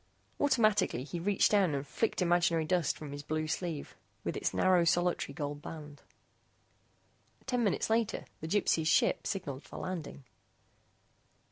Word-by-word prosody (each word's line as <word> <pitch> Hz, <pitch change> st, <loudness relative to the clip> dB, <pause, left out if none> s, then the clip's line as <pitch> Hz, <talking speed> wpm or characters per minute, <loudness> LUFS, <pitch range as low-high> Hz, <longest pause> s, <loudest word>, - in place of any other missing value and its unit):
Automatically 215 Hz, -, +2 dB
he 170 Hz, +5 st, -5 dB
reached 200 Hz, +3 st, +2 dB
down 190 Hz, -8 st, +3 dB
and 140 Hz, 0 st, -3 dB
flicked 220 Hz, +3 st, 0 dB
imaginary 170 Hz, -2 st, +2 dB
dust 175 Hz, -2 st, +1 dB
from 150 Hz, -2 st, -8 dB
his 145 Hz, 0 st, -6 dB
blue 155 Hz, +2 st, -2 dB
sleeve 160 Hz, -1 st, -4 dB, 0.3 s
with -, -, -2 dB
its -, -, -1 dB
narrow 185 Hz, -2 st, +4 dB
solitary 175 Hz, -4 st, +1 dB
gold 145 Hz, -1 st, -4 dB
band. 150 Hz, -2 st, -9 dB, 1.4 s
Ten 245 Hz, -2 st, 0 dB
minutes 200 Hz, -, +1 dB
later 225 Hz, -1 st, 0 dB
the 160 Hz, -, -5 dB
Gypsy's 165 Hz, -4 st, +2 dB
ship -, -, +3 dB
signaled 145 Hz, -8 st, -3 dB
for -, -, -11 dB
landing. 170 Hz, -6 st, -5 dB
170 Hz, 140 wpm, -32 LUFS, 150-190 Hz, 1.4 s, narrow